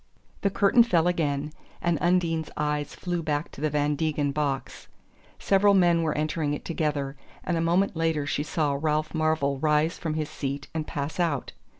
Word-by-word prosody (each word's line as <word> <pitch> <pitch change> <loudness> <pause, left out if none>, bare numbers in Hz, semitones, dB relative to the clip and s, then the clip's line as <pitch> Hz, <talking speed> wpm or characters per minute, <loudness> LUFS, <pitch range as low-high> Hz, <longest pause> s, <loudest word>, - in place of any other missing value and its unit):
The 200 - +2
curtain 200 +4 +4
fell 175 -8 +3
again, 150 -4 -1 0.3
and 170 -3 0
Undine's 170 -3 +1
eyes 150 -1 -1
flew 175 -1 -3
back 150 -1 -2
to - - -11
the 155 - +1
Van 150 0 +1
Degen 150 -2 0
box. 140 -2 -3 0.5
Several 200 +1 +4
men 175 -3 +4
were 160 -2 -1
entering 150 -1 -1
it - - -9
together, 150 -4 -2 0.3
and 175 - -1
a 165 - 0
moment 175 +3 +2
later 160 -3 0
she 145 - -1
saw 150 -1 0
Ralph 155 0 0
Marvell 155 -4 +1
rise 155 +2 +1
from 160 -2 -2
his 155 -1 -1
seat 140 0 -4
and 160 -1 -3
pass 145 +4 -4
out. 160 -6 0
155 Hz, 180 wpm, -26 LUFS, 145-170 Hz, 0.5 s, curtain